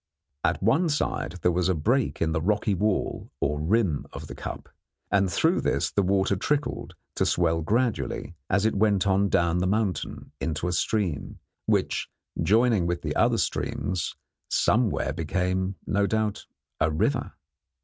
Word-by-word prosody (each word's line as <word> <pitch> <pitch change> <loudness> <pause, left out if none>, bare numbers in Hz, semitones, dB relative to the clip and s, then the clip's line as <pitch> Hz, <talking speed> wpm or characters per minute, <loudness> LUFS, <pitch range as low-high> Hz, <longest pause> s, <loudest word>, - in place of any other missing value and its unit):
At 80 +4 +1
one 160 - +3
side 145 - -1
there 90 - +4
was 90 +1 +1
a 95 - +2
break 120 - +1
in 80 - 0
the 80 0 0
rocky 105 +4 +1
wall 105 +2 -1
or 75 +1 0
rim 90 -3 +1
of - - -7
the - - -8
cup, - - -7 0.4
and 100 -2 +3
through - - +2
this - - 0
the 100 - +2
water 95 +1 +2
trickled, 145 +9 -2 0.2
to - - +3
swell 85 -2 +2
gradually, 105 - -1 0.2
as 100 +2 +2
it 110 - +2
went 100 -1 +2
on 100 0 +3
down 85 0 +2
the 90 - +1
mountain, 100 -2 -2
into 80 +1 -2
a 90 - -1
stream, 90 -6 -1 0.3
which, - - +1 0.3
joining 105 +1 +3
with 85 0 -2
other - - +3
streams, 90 -3 -2 0.3
somewhere 110 - +2
became, 90 +4 -1
no 100 0 +1
doubt, 110 -1 -1 0.3
a 80 - +3
river. 75 - 0
95 Hz, 155 wpm, -26 LUFS, 85-105 Hz, 0.4 s, there